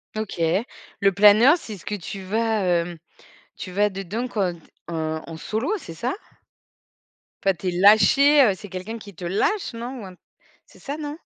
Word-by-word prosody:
OK, 215 -5 -5 0.6
le 200 0 +4
planeur 210 - +6
c'est 220 -9 -8
ce - - -17
que 210 - -3
tu 195 +1 -7
vas, 220 +3 0
hem, 175 -1 0 0.6
tu 185 - -8
vas 205 +2 +2
dedans 195 +6 -4
quand 195 -7 -1
t 170 - -14 0.3
en 160 -1 -3
en 165 -1 -8
solo, 220 - -3
c'est 165 - -10
ça? 245 +9 -2 1.3
Enfin 195 -1 +2
tu 185 - -5
es - - +1
lâché, 220 +10 +6
heu, 210 -6 +4
c'est 205 +2 -10
quelqu'un 190 +5 -6
qui 205 -4 -12
te 175 - -10
lâche 230 - 0
non? 240 +1 -6
Ou - - -8
un 185 - -12 0.5
c'est - - -20
ça, 285 +2 -5
non? 295 0 -6
205 Hz, 185 wpm, -23 LUFS, 180-230 Hz, 1.3 s, planeur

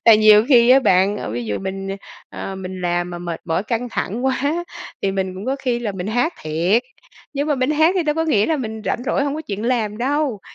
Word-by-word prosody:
Tại 225 -2 +8
nhiều 215 0 +7
khi 240 -3 +6
á 270 - +7
bạn, 195 -3 +3
ờ, 105 - -5
ví 120 0 -3
dụ 105 - -2
mình, 195 0 -5 0.4
ờ, 195 - -6
mình 185 0 -6
làm 175 0 -1
mà 175 - -6
mệt 170 -2 -5
mỏi, 165 +2 0
căng 235 +2 -2
thẳng 235 +6 -3
quá 285 +7 0 0.4
thì 195 -1 +1
mình 190 -1 -2
cũng 195 +6 -7
có 270 +1 0
khi 245 -2 0
là 220 -4 -3
mình 185 0 -5
hát 245 +10 +1
thiệt. 170 +9 +1 0.5
Nhưng 285 +2 -1
mà 295 - +3
mình 255 +3 0
hát 315 +4 +4
thì - - +2
đâu 300 -2 0
có 325 +1 0
nghĩa 215 -10 +2
là 320 - +1
mình 220 -4 -5
rảnh 240 - -1
rỗi, 280 - +1
hông 285 0 -1
có 315 - -5
chuyện 210 -4 -5
làm 225 -4 0
đâu. 270 -4 0
220 Hz, 250 wpm, -20 LUFS, 190-270 Hz, 0.5 s, Tại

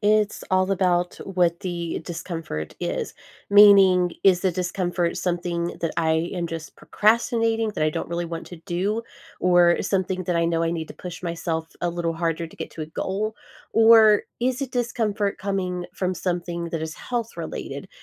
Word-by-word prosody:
it's 210 0 +2
all 185 +1 +2
about 180 -2 +1
what 175 -3 +1
the 170 -2 -3
discomfort 165 - -5
is. - - -3 0.4
Meaning, 195 -3 +7
is 185 -2 +5
the 185 -1 +1
discomfort 175 -1 -1
something 175 -1 -2
that 165 - 0
I 160 +1 +1
am 175 -2 -2
just 165 -1 -7
procrastinating 225 0 +1
that - - -1
I 155 - +2
don't - - -4
really 170 +1 -2
want 165 0 -6
to 175 - -9
do, 200 +5 -1 0.4
or 175 -1 +4
something 190 -1 -1
that 175 -1 0
I 170 - +2
know 165 0 +1
I 165 - +1
need 160 -2 -4
to - - -9
push 180 -1 -8
myself 165 -2 -2
a 175 - 0
little 170 -1 -2
harder 165 0 -1
to 160 - -16
get - - -6
to 160 - -6
a - - -5
goal, 200 +7 -3 0.4
or 225 -2 +7 0.2
is 255 +2 0
it 265 - -4
discomfort 225 -5 -1
coming 185 -2 -2
from 185 -1 -2
something 175 -1 -3
that 165 - -3
is 160 0 -4
health-related? 235 -2 -5
180 Hz, 175 wpm, -24 LUFS, 170-200 Hz, 0.4 s, Meaning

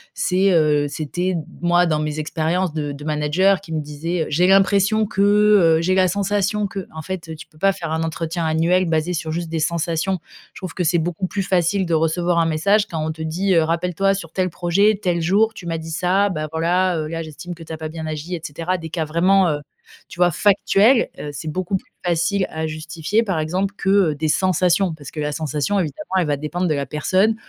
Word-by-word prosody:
c'est, 190 +1 +2
heu 150 -4 +3
c'était 175 +5 -2 0.3
moi 175 0 +3
dans 155 -2 +1
mes 150 0 -3
expériences 160 +3 -1
de 150 -2 -3
de 140 +1 -9
manager 155 +6 +2
qui 170 - -12
me 155 - -1
disait 160 +3 -3
heu: - - -5
«J'ai 175 +5 +2
l'impression 200 +2 +3
que, 195 - -2
heu, 205 -5 +5
j'ai 185 +2 +1
la 185 -1 +4
sensation 200 +2 0
que». 195 -3 -6
En 160 - -5
fait, 170 -2 -6
tu 155 - -11
peux 155 - -24
pas 195 +3 +4
faire 165 -4 -6
un 160 0 -1
entretien 165 +1 -3
annuel 165 +4 +2
basé 165 +1 0
sur 160 -1 -3
juste 170 0 -3
des 165 - -2
sensations. 170 +3 -1 0.4
Je - - -9
trouve 185 -3 -6
que 180 - -2
c'est 170 +1 +2
beaucoup 175 +3 -2
plus 195 +1 -2
facile 185 +1 +1
de 170 - -2
recevoir 170 +2 +1
un 165 - +3
message, 200 +7 +2
quand 160 -4 -3
on 160 - -1
te 160 - -9
dit, 185 +5 0
heu: 165 - +5
«Rappelle-toi 180 +4 0
sur 165 -4 -7
tel 185 0 0
projet, 195 +5 +2
tel 175 -3 0
jour, 205 +7 +2
tu 180 - -11
m'as 165 - -2
dit 160 0 -8
ça, 185 +5 +1
bah, 155 -4 -3
voilà, 175 +2 +1
heu, 155 - -3
là, 165 +1 -4
j'estime 160 +3 -8
que 165 - -15
tu 160 - -11
as - - -5
pas 155 0 -5
bien 160 0 -6
agi», 155 +3 -5
et 165 - -7
cetera, 165 +5 -3
des 160 - -7
cas 160 -1 -2
vraiment, 180 +3 +3
heu, 145 - -1 0.5
tu - - -13
vois, 175 -1 +4
factuels. 205 - +3
Heu, 150 - -5
c'est 155 +2 -5
beaucoup 185 +3 -2
plus - - -17
facile 175 +3 +1
à 160 0 -3
justifier, 160 +7 -1
par 190 -6 -1
exemple, 185 +6 -1
que, 195 - -2
heu, 195 -6 +3
des 155 +2 -2
sensations 185 +1 +2
parce 145 -3 -10
que - - -7
la 150 0 -1
sensation, 155 +6 -1
évidemment, 185 +4 -4
elle 170 - -1
va 145 -1 0
dépendre 175 +5 -2
de 155 - +1
la 140 -1 -2
personne. 185 - +1
170 Hz, 230 wpm, -21 LUFS, 155-190 Hz, 0.5 s, heu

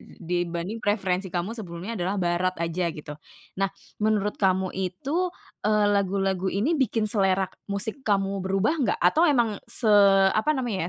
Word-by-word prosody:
dibanding 175 +4 -4
preferensi 190 -3 0
kamu 175 +4 -3
sebelumnya 190 -2 -6
adalah 190 -1 -2
barat 180 0 0
aja 170 +1 -1
gitu. 150 -2 -7 0.5
Nah 195 - +2 0.3
menurut 210 -1 0
kamu 190 -1 +2
itu, 265 - -2 0.3
eee, 210 0 +2
lagu-lagu 195 -1 0
ini 210 - 0
bikin 255 -7 +1
selera 195 -3 +2 0.2
musik 210 +6 -3
kamu 195 -4 0
berubah 195 +6 +1
nggak? 260 - +1
Atau 315 - +5
emang 235 -7 +1
se 220 -4 0 0.4
apa 290 +7 +1
namanya 210 -9 -2
195 Hz, 145 wpm, -25 LUFS, 185-220 Hz, 0.5 s, Atau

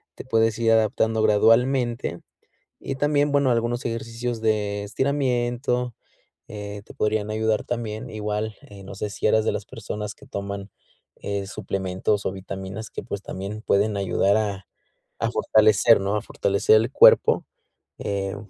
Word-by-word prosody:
te - - -8
puedes 115 -3 +1
ir 115 -1 +2
adaptando 110 0 +2
gradualmente. 115 0 +2 0.6
Y 135 - -4
también, 145 +1 +1
bueno, 140 -2 +3
algunos 120 +1 0
ejercicios 115 +1 -3
de 105 -2 0
estiramiento, 125 0 -1 0.5
eh, 105 -1 -7
te - - -13
podrían 105 0 -1
ayudar 110 0 0
también. 110 -3 -4
Igual, 105 0 -3
eh, 100 -1 -13
no 95 - -9
sé 105 +2 -3
si - - -5
eras 110 0 +3
de - - +2
las - - -4
personas 105 0 -6
que - - -17
toman, 100 0 -5 0.5
eh, 100 -1 -3
suplementos, 95 0 -2
o, - - 0
vitaminas 95 +2 -7
que, - - -7
pues, 100 - -5
también 100 +2 -6
pueden 105 0 +1
ayudar 100 +1 +2
a 100 -3 -3 0.5
a - - 0
fortalecer, 110 +1 +4
¿no? 100 +2 -1
A 105 - -2
fortalecer 100 +2 +2
el 115 +3 +2
cuerpo. - - +6 0.5
Eh, 100 -1 -3
110 Hz, 150 wpm, -24 LUFS, 100-115 Hz, 0.6 s, cuerpo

